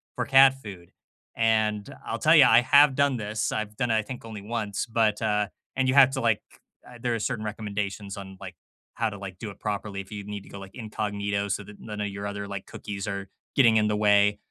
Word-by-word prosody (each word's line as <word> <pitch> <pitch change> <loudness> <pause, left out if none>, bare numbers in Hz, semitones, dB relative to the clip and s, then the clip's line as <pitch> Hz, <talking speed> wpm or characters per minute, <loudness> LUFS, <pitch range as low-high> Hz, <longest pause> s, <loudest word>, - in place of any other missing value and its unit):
for - - -2
cat 135 0 +7
food, 95 -5 -10 0.4
and 110 -2 +1
I'll 115 - -3
tell 155 +2 +5
ya, 135 -5 +8
I 115 +2 +7
have 140 +2 +5
done 140 -2 +2
this. 105 -1 -2
I've 110 -1 -3
done 120 +2 -1
it - - +3
I 110 - 0
think 125 +4 -8
only 110 -2 -8
once, 105 -2 -3
but, 110 -2 +1
uh, 105 -1 +1 0.3
and 130 -1 +1
you 130 - +1
have 135 -2 +7
to 135 -1 -3
like 115 -3 +2 0.5
uh, 125 - -12
there 120 -1 0
are - - -3
certain 110 0 -3
recommendations 105 -2 -4
on, 95 -1 -9
like, 95 -2 -8 0.4
how 115 -1 0
to, 100 - -8
like, 95 -2 -8
do 110 - -5
it 100 - -11
properly 100 -1 -3
if 95 +1 -15
you 105 -1 -5
need 105 -1 -6
to - - -16
go, 100 - -9
like, 95 0 -11
incognito 100 -3 -3
so 100 +1 -2
that 105 +1 -14
none 105 -1 -6
of 105 - -2
your 100 +1 -5
other, 100 0 -5
like, 100 -1 -6
cookies 100 -1 -7
are 100 -1 -4 0.3
getting 115 -5 +5
in 105 0 +3
the 105 - 0
way 105 0 +4
105 Hz, 240 wpm, -26 LUFS, 100-115 Hz, 0.5 s, ya